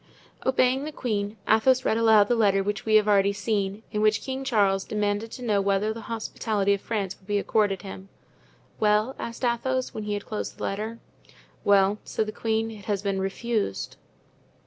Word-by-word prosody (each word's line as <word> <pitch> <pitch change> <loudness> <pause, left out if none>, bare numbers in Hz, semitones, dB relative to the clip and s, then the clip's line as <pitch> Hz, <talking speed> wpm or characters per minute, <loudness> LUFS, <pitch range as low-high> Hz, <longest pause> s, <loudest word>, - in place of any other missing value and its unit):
Obeying 260 +1 +3
the 305 - -4
queen, 210 -6 -3
Athos 255 +4 +4
read - - +2
aloud 220 -2 +5
the 245 - +2
letter 200 -3 +3
which 205 +2 -3
we 215 - +4
have 215 -1 +5
already 200 -1 +4
seen, 200 0 -2
in 210 -1 -1
which 215 -1 +2
King 265 0 -4
Charles 200 -7 +2
demanded 210 +1 -1
to 250 - -8
know 210 -4 +2
whether 200 +2 +1
the 230 - -8
hospitality 215 -3 0
of 200 - -2
France 200 -4 -3
would 190 - -25
be 205 -1 +1
accorded 205 -1 +1
him. 195 0 -9 0.7
"Well?" 215 +4 +2
asked 235 +2 -4
Athos, 255 +2 -1
when 215 - -5
he 210 0 -1
had 205 - -5
closed 215 - -5
the - - -7
letter. 215 +3 -3 0.7
"Well," 200 +1 +4
said 220 - -2
the 215 - -4
queen, 225 0 -1
"it 205 -3 -11
has 205 -2 -1
been 195 -1 -1
refused." 200 - -2
210 Hz, 190 wpm, -26 LUFS, 200-225 Hz, 0.7 s, aloud